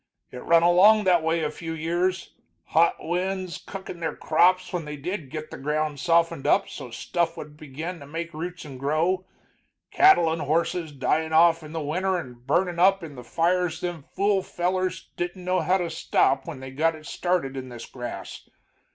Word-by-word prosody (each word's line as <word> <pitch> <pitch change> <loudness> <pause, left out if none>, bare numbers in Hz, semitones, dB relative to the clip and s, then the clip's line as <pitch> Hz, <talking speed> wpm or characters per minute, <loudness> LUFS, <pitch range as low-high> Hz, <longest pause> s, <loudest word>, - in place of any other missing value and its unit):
It 125 - -8
run 165 0 +4
along 195 +5 +6
that 180 -3 +4
way 160 +1 0
a 150 - -1
few 165 +1 -6
years, 175 +3 -1 0.3
hot 165 +2 +3
winds 185 +1 -2
cookin' 190 -3 -8
their 165 - -3
crops 180 +4 +2
when 175 -3 -2
they 150 0 -6
did 165 -1 -5
git 155 +2 -7
the - - -8
ground 150 +1 -1
softened 165 -3 +2
up - - +3
so 130 -4 -8
stuff 165 +8 -2
would 150 0 -9
begin 155 +4 -7
to 140 - -11
make 170 +3 -5
roots 175 +2 -6
and 135 -3 -9
grow, 165 +7 0 0.6
cattle 265 - +5
and 165 - -3
horses 165 +2 0
dyin' 160 +3 0
off 165 +1 +5
in 155 -1 -10
the 165 0 -3
winter 185 +6 0
and 125 -6 -9
burnin' 175 +3 +1
up 195 +1 +4
in 155 -3 -8
the 125 -2 -10
fires 170 +5 0
them 175 -3 -4
fool 200 +6 0
fellers 185 0 -2
didn't 175 +1 -4
know 185 0 +1
how 185 +2 +2
to 175 -3 -3
stop 135 -3 +1
when 130 - -7
they 130 0 -8
got 155 +3 0
started 175 -5 -1
in 130 -1 -6
this 120 -1 -8
grass. 120 -2 -8
165 Hz, 185 wpm, -25 LUFS, 150-180 Hz, 0.6 s, along